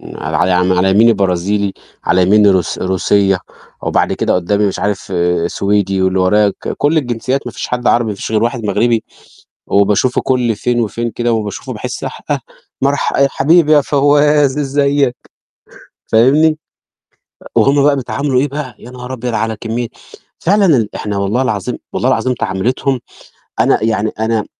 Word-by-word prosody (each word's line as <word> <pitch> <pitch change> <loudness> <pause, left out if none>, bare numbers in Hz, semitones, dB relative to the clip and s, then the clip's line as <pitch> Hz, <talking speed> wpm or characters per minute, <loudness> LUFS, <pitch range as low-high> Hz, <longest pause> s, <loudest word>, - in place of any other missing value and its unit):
على - - -3
على 90 0 +2
م - - +3
على 90 +1 +2
يمني 115 +4 +5
برازيلي، 100 +2 0 0.3
على 90 +1 +2
يميني 105 +2 +5
روس 95 -4 0
روسيّة، 95 +1 +1 0.4
وبعد - - +1
كده - - 0
قُدّامي 100 +3 +1
مش 95 - -4
عارف، 100 0 -3 0.3
سويدي، 100 0 0
واللي 95 0 +1
ورايا 105 +3 +3
ك - - -7
كل 150 +3 +2
الجنسيّات 130 0 -1
ما - - -5
فيش - - -6
حد 125 0 -2
عربي، 120 -2 +2
ما 105 - -3
فيش 100 - -6
غير 110 0 +1
واحد 120 -1 -2
مغربي، 115 +2 +1 0.6
وباشوفه 100 +5 +2
كل 125 -4 0
فين 120 +2 -1
وفين 115 +1 -3
كده، 120 +1 -1
وباشوفه 105 -3 -4
باحِس - - -6
حأه - - -4 0.4
مرح 140 +1 0
آآ، - - +1
يا 140 - +5
حبيبي 155 +2 +3
يا 150 - +5
فوّاز 145 0 +2
إزّيك. 140 -2 +1 0.9
فاهمني؟ 150 +7 +3 0.8
آآ، - - -12
وهُم 140 0 +3
بقى 145 0 +4
بيتعاملوا 135 0 -1
إيه 145 - 0
بقى، 140 -2 -6
يا 125 - -12
نهار 125 +1 -8
أبيض 125 -1 -4
على 110 +1 -1
كمّية 115 +1 -3 0.5
فعلًا 200 +3 +2
ال 125 - +2
إحنا 105 -1 -3
والله 100 +6 0
العظيم 105 -8 -2 0.2
والله - - 0
العظيم 130 -1 +1
تعاملتهم، 125 +6 -1 0.6
أنا - - +2
يعني 110 -1 0
أنا 110 -1 0
115 Hz, 165 wpm, -15 LUFS, 100-135 Hz, 0.9 s, يمني